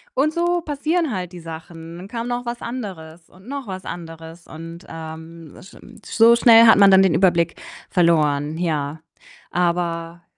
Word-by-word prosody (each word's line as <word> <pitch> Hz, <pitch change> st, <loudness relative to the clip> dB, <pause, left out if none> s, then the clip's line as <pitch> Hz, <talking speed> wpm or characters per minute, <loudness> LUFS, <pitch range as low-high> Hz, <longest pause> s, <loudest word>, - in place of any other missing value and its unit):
und 310 Hz, -10 st, +1 dB
so 345 Hz, +1 st, 0 dB
passieren 310 Hz, -1 st, -1 dB
halt 180 Hz, -2 st, -5 dB
die 175 Hz, -, -9 dB
Sachen. 165 Hz, +1 st, -10 dB
Dann 185 Hz, +2 st, -10 dB
kam 230 Hz, +1 st, -5 dB
noch 245 Hz, 0 st, -3 dB
was 235 Hz, 0 st, -5 dB
anderes 175 Hz, -9 st, -8 dB
und 185 Hz, +4 st, -19 dB
noch 275 Hz, -3 st, -6 dB
was 185 Hz, -1 st, -7 dB
anderes 165 Hz, 0 st, -9 dB
und, 165 Hz, +1 st, -10 dB
ähm, 160 Hz, 0 st, -10 dB
sch 185 Hz, -, -15 dB, 0.3 s
so 230 Hz, +1 st, +5 dB
schnell 230 Hz, -1 st, +7 dB
hat 225 Hz, -, +7 dB
man 200 Hz, -, +7 dB
dann 190 Hz, 0 st, +7 dB
den 185 Hz, -4 st, +2 dB
Überblick 170 Hz, -2 st, +1 dB, 0.3 s
verloren, 155 Hz, -4 st, +1 dB
ja. 155 Hz, -3 st, -2 dB, 0.5 s
Aber 170 Hz, -1 st, -2 dB
175 Hz, 160 wpm, -21 LUFS, 165-230 Hz, 0.5 s, schnell